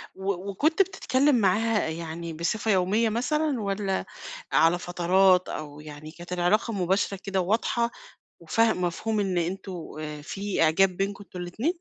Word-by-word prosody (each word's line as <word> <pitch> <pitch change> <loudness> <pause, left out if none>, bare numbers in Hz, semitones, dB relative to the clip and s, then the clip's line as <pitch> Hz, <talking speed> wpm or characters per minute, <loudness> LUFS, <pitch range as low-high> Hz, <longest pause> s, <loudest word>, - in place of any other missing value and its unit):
و 190 0 -3
وكنت 310 - +2
بتتكلّم 290 -8 +2
معاها 215 0 +2
يعني 165 0 -5
بصفة 205 +7 -1
يوميَّة 200 +5 +2
مثلًا، 270 +3 0
والّا 195 -1 -1 0.5
على 170 +2 +4
فترات، 180 +1 +3
أو 150 -1 -6
يعني 150 0 -10
كانت 175 +2 -8
العلاقة 205 +6 +1
مباشرة 190 +1 0
كده 195 -2 0
وواضحة، 230 +4 0 0.5
وفاه 225 +7 +2
مفهوم 185 +5 -1
إن 185 -3 0
أنتم 185 +3 -3 0.3
آآ 150 -1 -6
في 195 +3 -2
إعجاب 165 +5 +5
بينكم 200 +1 -2
أنتم 180 -1 -9
الاتنين؟ 220 - -2
195 Hz, 140 wpm, -26 LUFS, 175-220 Hz, 0.5 s, إعجاب